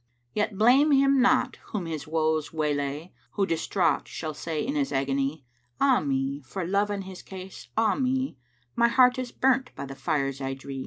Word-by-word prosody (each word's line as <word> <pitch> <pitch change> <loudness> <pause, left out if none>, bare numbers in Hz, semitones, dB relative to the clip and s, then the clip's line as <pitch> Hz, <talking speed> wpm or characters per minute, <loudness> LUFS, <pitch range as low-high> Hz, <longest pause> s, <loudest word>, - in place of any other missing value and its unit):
Yet 210 -1 -1
blame 255 +8 +5
him 275 -1 +4
not 250 - +3
whom 205 -6 -4
his 160 -1 -5
woes 155 -1 0
waylay 150 +1 -2
* - - -37
Who 200 - +1
distraught 165 -2 0
shall 155 -1 -5
say 155 +2 -3
in 275 - -2
his 285 -2 0
agony, 135 +1 -1 0.3
'Ah 270 -3 +4
me, 135 0 -1
for 175 +8 -5
Love 200 +3 +1
and 200 -1 -3
his 185 -1 -9
case, 190 0 -10
ah 220 -2 +3
me: 260 - -1 0.4
My 235 0 +4
heart 250 +1 +4
is 250 -2 -4
burnt 265 0 +2
by - - -5
the 135 - -7
fires 140 -2 -1
I 135 0 -2
dree!' 135 0 -7
180 Hz, 190 wpm, -27 LUFS, -, 0.4 s, blame